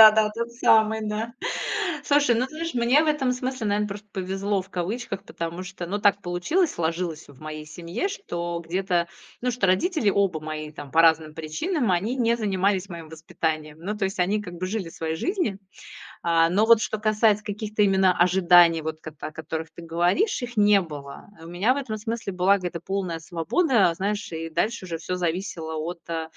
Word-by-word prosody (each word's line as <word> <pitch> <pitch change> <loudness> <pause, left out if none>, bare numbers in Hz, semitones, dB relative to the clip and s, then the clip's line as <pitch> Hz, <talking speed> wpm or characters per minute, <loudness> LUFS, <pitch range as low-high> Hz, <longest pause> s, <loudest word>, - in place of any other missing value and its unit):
да 220 -1 +12
да, 215 0 +2
тот 235 +2 -4
самый, 220 -2 +4
да. 220 +3 -3 0.7
Слушай, 285 -4 +4
ну, 245 +3 +1
ты - - -18
знаешь, 330 -1 -4
мне 245 +5 +4
в 315 - -1
этом 285 -4 +2
смысле, 255 -2 -3
наверно, 210 0 +1
просто 205 +1 -8
"повезло" 195 +1 -1
в 190 - -19
кавычках, 195 +3 -4
потому 170 +2 -5
что, 185 -1 -7
ну, 200 +4 -2
так 205 0 +3
получилось, 200 - 0
сложилось 165 -1 -3
вот 140 -3 -16
в - - -20
моей 155 0 -6
семье, 170 - -3
что 175 - -4
где-то 175 0 0 0.3
ну, 250 - 0
что 240 -4 0
родители 250 - +2
оба 195 -5 +1
мои 155 0 -5
там 145 -2 -9
по 160 - +4
разным 160 -2 +3
причинам, 210 - -1
они 205 +9 0
не 235 -2 +2
занимались 195 -3 0
моим 170 -3 -8
воспитанием. 155 -1 -3
Ну, 205 +5 -3
то 210 - -1
есть, 190 0 -3
они 200 +4 +1
как 175 -3 -8
бы 180 +2 -3
жили 195 -2 -3
своей 160 -1 -3
жизнью. 345 - -1 0.6
А, 165 -1 +4
но 200 +5 +3
вот, 230 -1 +7
что 215 - -2
касается 215 0 +2
каких-то 210 +1 -2
именно 190 -2 +4
ожиданий, 175 -2 +5
вот, 155 0 -4
ката 155 -3 -7
о - - -12
которых 160 +1 -5
ты 170 - -10
говоришь, 175 - +1
их 245 -1 -6
не 205 -1 +5
было. 145 -5 -8
У 165 - -10
меня 195 +9 +2
в - - -5
этом 255 -6 -3
смысле 220 -1 -4
была 185 +2 +3
где-то 175 -3 -4
полная 185 -3 -3
свобода, 185 - +2
знаешь, 205 +3 -2
и 165 0 -4
дальше 190 +6 -1
уже 170 -3 -4
всё 180 +3 -3
зависело 170 -2 -3
от, 170 +3 -4
м, 165 -1 -2
190 Hz, 200 wpm, -25 LUFS, 165-220 Hz, 0.7 s, да